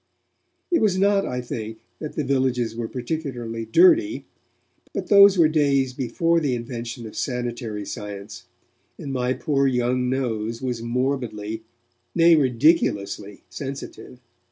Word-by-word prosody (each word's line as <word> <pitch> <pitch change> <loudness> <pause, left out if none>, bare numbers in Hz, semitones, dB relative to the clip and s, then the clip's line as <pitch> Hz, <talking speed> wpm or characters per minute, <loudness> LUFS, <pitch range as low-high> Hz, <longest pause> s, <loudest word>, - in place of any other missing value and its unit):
It 340 - +3
was 200 -4 +2
not, 200 +1 +3
I 125 0 -3
think, 110 -2 -6 0.2
that 155 - -6
the 150 - -1
villagers 130 -4 0
were 115 -1 -3
particularly 120 -4 -4
dirty, 340 - +4 0.7
but - - -4
those 200 -2 +8
were 165 -3 +6
days 140 -4 +2
before 165 +7 +1
the 140 -6 0
invention 120 0 -6
of 110 - -9
sanitary 120 -4 -3
science, 100 +1 -7 0.5
and 140 - -6
my 125 -1 0
poor 140 -1 +1
young 125 0 0
nose 115 -4 -2
was 125 -3 -3
morbidly, 115 -3 -2 0.5
nay 170 0 +6
ridiculously 120 - +1
sensitive. 135 +4 -8
125 Hz, 130 wpm, -23 LUFS, 115-150 Hz, 0.7 s, those